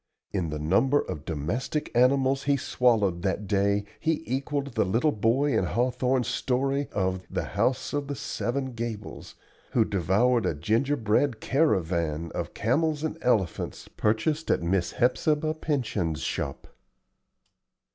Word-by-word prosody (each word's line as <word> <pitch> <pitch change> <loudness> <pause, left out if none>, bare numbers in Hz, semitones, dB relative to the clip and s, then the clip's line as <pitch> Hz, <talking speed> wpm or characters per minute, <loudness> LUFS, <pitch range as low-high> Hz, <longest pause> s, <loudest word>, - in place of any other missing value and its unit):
In 90 -5 -1
the 75 - -3
number 100 - +3
of 75 0 -5
domestic 85 - -2
animals 135 +2 +3
he 140 0 +3
swallowed 110 -9 +2
that 100 +2 -1
day 100 0 +1 0.2
he 160 0 0
equalled 140 +1 -2
the 110 - +2
little 115 +11 +2
boy 130 +6 +1
in - - +2
Hawthorne's 125 +1 +1
story 135 +2 0
of 95 -2 -1
"The - - -2
House 130 - -1
of 145 -1 -1
the 140 - -3
Seven 130 +2 -3
Gables," 115 -3 -6 0.4
who 115 - +4
devoured 105 +7 +2
a - - -1
ginger 115 - +1
bread 110 +3 +1
caravan 85 - 0
of - - -4
camels 150 +6 +1
and 160 - -2
elephants 105 - 0
purchased 145 +9 0
at - - +2
Miss 85 0 0
Hepzibah 150 +5 +1
Pyncheon's 115 - -2
shop. - - -3
120 Hz, 135 wpm, -27 LUFS, 95-140 Hz, 0.4 s, who